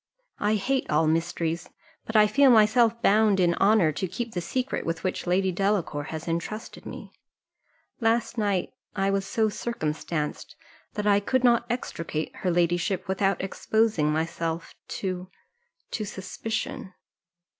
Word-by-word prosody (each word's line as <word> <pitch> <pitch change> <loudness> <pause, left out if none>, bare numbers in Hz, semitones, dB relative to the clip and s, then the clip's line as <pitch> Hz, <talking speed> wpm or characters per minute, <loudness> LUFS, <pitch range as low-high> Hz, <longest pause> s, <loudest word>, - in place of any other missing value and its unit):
I 210 +1 +2
hate 260 +6 0
all 150 +1 +3
mysteries, 165 +1 -1 0.4
but 220 - -5
I 215 -1 +7
feel 275 +6 +5
myself 230 0 +5
bound 210 -1 +4
in 175 -2 +4
honour 195 -5 +5
to 185 +5 -3
keep 230 +6 -5
the 175 - -2
secret 255 +9 -2
with 165 0 -3
which 185 -1 -2
Lady 185 +1 +2
Delacour 185 -6 0
has 160 +1 -6
entrusted 170 +7 -4
me. - - -9 0.9
Last 230 0 +1
night 205 -5 0 0.2
I 195 0 +1
was 195 0 -1
so 220 +1 +1
circumstanced, 155 -9 -3 0.4
that 210 -1 -2
I 205 -1 +5
could 255 +5 0
not 235 -1 +4
extricate 165 -9 -3
her 185 - -1
ladyship 175 +3 +1
without 195 0 +1
exposing 195 -4 +1
myself 165 +1 -2
to 185 -1 -4 0.6
to 215 - -2
suspicion." 195 0 -5
195 Hz, 140 wpm, -26 LUFS, 170-220 Hz, 0.9 s, I